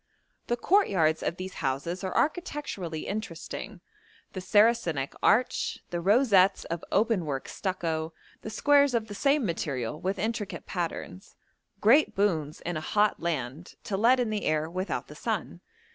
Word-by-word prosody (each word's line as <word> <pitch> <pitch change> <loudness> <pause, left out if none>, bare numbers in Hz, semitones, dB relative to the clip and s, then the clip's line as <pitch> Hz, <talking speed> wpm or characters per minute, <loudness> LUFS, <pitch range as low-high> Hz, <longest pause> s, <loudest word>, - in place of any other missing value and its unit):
The 240 - 0
courtyards 190 - +3
of 170 - -2
these 185 0 -6
houses 150 +7 -2
are 185 - -2
architecturally 285 - -2
interesting: 200 -1 -6 0.5
the 185 - -5
Saracenic 195 - +2
arch, 250 +3 +2
the 175 -1 -2
rosettes 200 -1 +4
of 170 0 -4
open 215 -3 +2
work 135 -2 -3
stucco, 165 -4 -2 0.3
the - - -6
squares 285 +2 +4
of 220 -2 -1
the - - -5
same 275 +4 +2
material 150 - -3
with 190 +2 -1
intricate 215 +1 -3
patterns 180 +1 -5 0.5
great 270 +9 +5
boons 160 -7 0
in 175 -2 -3
a - - -4
hot 210 +6 +1
land 155 -1 -4
to 200 - -3
let 235 +6 +4
in 235 -3 0
the 210 -1 -2
air 155 0 +1
without 185 +4 -3
the - - -10
sun. - - -3
190 Hz, 150 wpm, -28 LUFS, 165-225 Hz, 0.5 s, great